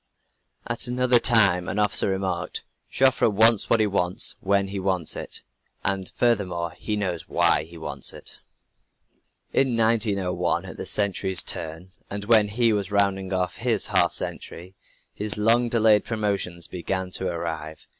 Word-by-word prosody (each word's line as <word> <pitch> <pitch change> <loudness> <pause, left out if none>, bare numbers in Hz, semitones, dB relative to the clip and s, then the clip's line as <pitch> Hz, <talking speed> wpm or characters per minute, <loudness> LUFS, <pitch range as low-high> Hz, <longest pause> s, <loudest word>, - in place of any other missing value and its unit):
At - - 0
another 125 0 +3
time 100 -7 +3
an - - -3
officer 105 -1 +1
remarked: 95 -2 -3 0.3
"Joffre 130 -3 +3
wants 110 +1 +4
what 115 - +3
he 110 - +4
wants 90 -3 +1
when 100 0 0
he 100 0 -4
wants 95 -4 -1
it - - -6 0.4
and 95 -1 0
furthermore 90 -8 0
he 105 +5 -4
knows 90 -5 -3
why - - +2
he 85 +1 -14
wants 80 - -4
it!" - - -11 1.1
In 130 -4 +2
1901, 105 -5 +1
at - - -10
the - - -6
century's 95 -3 +2
turn, 80 +3 -4 0.2
and 100 0 -4
when 110 -2 +5
he 115 +2 +1
was 100 -2 -2
rounding 100 -2 0
out 90 -1 -1
his 115 0 0
half - - +3
century, 90 +3 -6 0.4
his 105 0 -4
long 115 +3 +3
delayed 110 -3 +4
promotions 100 -6 -3
began 95 +1 -4
to 95 - -3
arrive. 80 -3 -5
100 Hz, 150 wpm, -24 LUFS, 90-110 Hz, 1.1 s, when